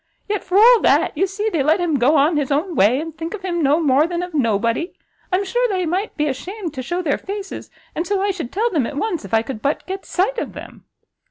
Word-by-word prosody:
yet, 415 -1 -2
for 365 - 0
all 465 +2 +7
that, - - +3
you 385 - +1
see 410 +3 -3
they 325 - +1
let 310 +6 +3
him 325 -6 0
go 280 +6 +4
on 300 +4 +3
his 290 -2 -1
own 320 +6 0
way, 220 +7 +4
and 320 0 -6
think 330 +4 -5
of 390 - -11
him 345 -2 -1
no 295 +2 +3
more 295 0 +3
than 350 0 -3
of 360 -1 -7
nobody! 230 - 0 0.4
I'm 375 +2 +1
sure 485 +5 +1
they 370 -3 0
might 370 +6 -2
be 300 - +1
ashamed 345 +5 -4
to 260 - -5
shew 345 +8 -3
their 290 -4 0
faces, 395 0 -6 0.2
and 330 - -3
so 400 -1 0
I 400 +1 +1
should 335 -10 -6
tell 460 +5 0
them 285 -9 +1
at 285 - -7
once, 350 - -2
if 195 - -10
I 225 - +3
could 230 -4 -6
but 285 - -1
get 385 +1 -5
sight 455 +7 0
of - - -5
them." - - -11
340 Hz, 260 wpm, -20 LUFS, 285-390 Hz, 0.4 s, all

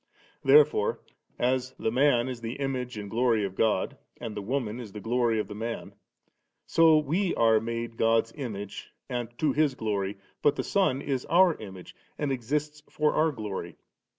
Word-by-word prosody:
There 450 +1 +8
fore, 460 +2 -2 0.4
as 130 +1 0
'the 110 - -1
man 125 -1 +3
is 125 -2 -5
the 115 0 -4
image 130 -4 -3
and 105 -1 -5
glory 115 -1 +2
of 95 - -5
God, 105 -1 0 0.2
and 115 -3 -6
the - - -4
woman 115 0 -2
the 110 -4 -8
glory 115 +1 +1
of - - -2
the 105 - -7
man'^' 115 +2 -5 0.7
so 165 -1 +5
we 165 +6 0
are 115 -1 +4
made 115 +1 -4
God's 115 0 +2
image 105 -8 -6 0.2
and 120 -2 -3
to 155 - +1
His 150 -3 +2
gloiy; 100 -3 -2 0.2
but 145 - +3
the - - -2
Son 165 -9 +1
is 135 -3 -2
our 175 -1 +5
image^ 95 -4 -10 0.2
and 145 -2 -1
exists 150 +4 -2
for 150 -1 +1
our 160 +1 +3
glory. 105 -7 -6
120 Hz, 175 wpm, -28 LUFS, 110-145 Hz, 0.7 s, There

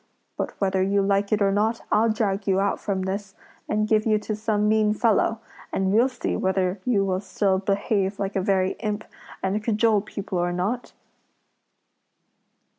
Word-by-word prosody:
But - - -4
whether 190 -1 +1
you 200 +1 +2
like 200 0 +1
it 210 -1 +3
or 195 - +3
not, 220 +3 0
I'll 225 +2 +4
drag 205 -2 -1
you 190 -1 +3
out 200 +1 0
from 195 -2 -2
this, 195 +1 -4 0.3
and 215 0 +1
give 215 0 +3
you 215 -1 +4
to 210 0 -3
some 210 -1 0
mean 215 0 +3
fellow, 225 0 +2 0.3
and 190 0 0
we'll 240 +5 +4
see 250 -2 -3
whether 190 0 0
you 210 -6 +2
will 185 -1 -1
still 195 -2 0
behave 200 0 0
like 195 0 -3
a 190 - +1
very 190 0 +1
imp, 215 -1 -2 0.4
and 200 +3 -1
cajole 215 -1 +2
people 200 -2 -4
or 175 0 0
not?" 200 +8 -2
200 Hz, 175 wpm, -24 LUFS, 195-215 Hz, 0.4 s, I'll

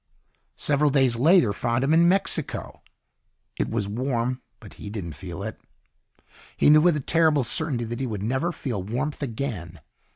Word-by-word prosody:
Several 145 0 +2
days 135 -4 +3
later 155 - +4
found 120 +4 -1
him 145 +3 +2
in 170 +1 +5
Mexico. 195 +2 -1 0.8
It - - 0
was 110 -3 -2
warm 125 +2 -2 0.2
but - - -13
he - - -6
didn't 100 -6 -5
feel 85 +5 -7
it. 110 - -7 1.0
He - - +5
knew 155 0 +7
with 170 -1 +4
a - - -3
terrible 155 -1 +3
certainty 140 -1 0
that 120 +1 -5
he 135 - -2
would 105 -4 -4
never 130 +10 0
feel 120 - -4
warmth 125 +11 -3
again. 110 - -5
130 Hz, 165 wpm, -25 LUFS, 110-150 Hz, 1.0 s, knew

